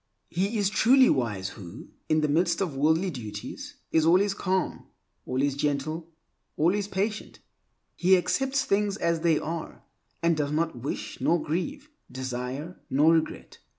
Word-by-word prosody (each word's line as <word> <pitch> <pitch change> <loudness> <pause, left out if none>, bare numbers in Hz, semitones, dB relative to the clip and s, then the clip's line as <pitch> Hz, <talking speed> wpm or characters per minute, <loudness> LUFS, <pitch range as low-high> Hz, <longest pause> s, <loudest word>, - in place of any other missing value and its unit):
He 195 +6 0
is 200 -1 +1
truly 255 +4 +5
wise 105 -8 -1
who, 95 +1 -10 0.2
in 155 0 +3
the 150 - +2
midst 170 +3 +2
of 180 -8 -2
worldly 160 +6 +2
duties, 115 -7 -7 0.2
is 160 - +3
always 185 +5 +4
calm, 190 -2 -2 0.4
always 135 +2 +1
gentle, 150 +3 -2 0.5
always 190 +6 +2
patient. 205 +2 -3 0.6
He 185 +1 +5
accepts 270 +8 0
things 205 -1 +1
as 170 -3 +1
they 160 -1 +3
are, 165 +1 -5 0.4
and 170 -1 +3
does 145 -2 -1
not 160 0 0
wish 125 +4 -5
nor 170 - +3
grieve, 270 - -3 0.2
desire 130 +6 -5
nor 150 +5 +5
regret. 160 -1 -2
165 Hz, 145 wpm, -27 LUFS, 145-190 Hz, 0.6 s, truly